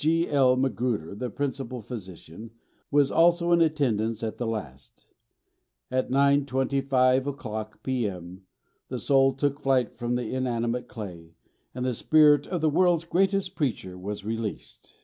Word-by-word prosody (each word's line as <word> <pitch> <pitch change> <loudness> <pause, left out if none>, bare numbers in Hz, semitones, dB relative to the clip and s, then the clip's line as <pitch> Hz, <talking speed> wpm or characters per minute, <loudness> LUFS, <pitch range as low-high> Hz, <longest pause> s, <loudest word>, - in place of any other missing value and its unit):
G.L. 150 -5 +3
Magruder, 125 -9 -1
the 125 +5 -4
principal 135 -3 -4
physician, 100 -2 -9 0.4
was 145 -1 +3
also 170 +1 +3
in 170 -1 +5
attendance 115 -9 0
at 110 - -4
the 120 - -2
last. 70 - -7 0.9
At 130 0 0
9.25 135 -1 +2
o'clock 110 -6 -6
p.m., 95 -8 -3 0.5
the - - -4
soul 135 -1 +3
took 140 +1 -1
flight 130 -5 0
from 120 0 -1
the 125 -2 -3
inanimate 125 -1 -1
clay, 85 -7 -9 0.4
and 125 0 -3
the 130 - 0
spirit 150 +3 +4
of 180 -3 -3
the 160 - +3
world's 175 0 +3
greatest 190 +1 +1
preacher 115 - -3
was 100 +2 -6
released." 110 -1 -6
130 Hz, 135 wpm, -26 LUFS, 110-145 Hz, 0.9 s, in